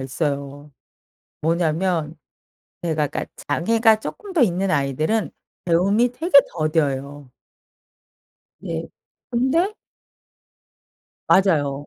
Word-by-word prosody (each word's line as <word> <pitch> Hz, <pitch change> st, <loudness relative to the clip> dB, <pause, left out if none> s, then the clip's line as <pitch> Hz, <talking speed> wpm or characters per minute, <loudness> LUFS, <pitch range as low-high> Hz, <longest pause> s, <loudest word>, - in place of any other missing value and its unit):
있어요. 140 Hz, +1 st, -4 dB, 0.7 s
뭐냐면 165 Hz, 0 st, 0 dB, 0.7 s
제가 155 Hz, -3 st, 0 dB
그러니까 -, -, -5 dB, 0.2 s
장애가 220 Hz, +8 st, +3 dB
쪼끔 400 Hz, -, -7 dB
더 330 Hz, -, +2 dB
있는 190 Hz, -3 st, +2 dB
아이들은 155 Hz, -, 0 dB, 0.3 s
배움이 200 Hz, +8 st, +2 dB
되게 320 Hz, +3 st, +3 dB
더뎌요. 145 Hz, -4 st, -2 dB, 1.3 s
네. -, -, -4 dB, 0.4 s
근데 295 Hz, -, +1 dB, 1.5 s
맞아요. 145 Hz, -7 st, +2 dB
165 Hz, 190 characters per minute, -22 LUFS, 145-220 Hz, 1.5 s, 장애가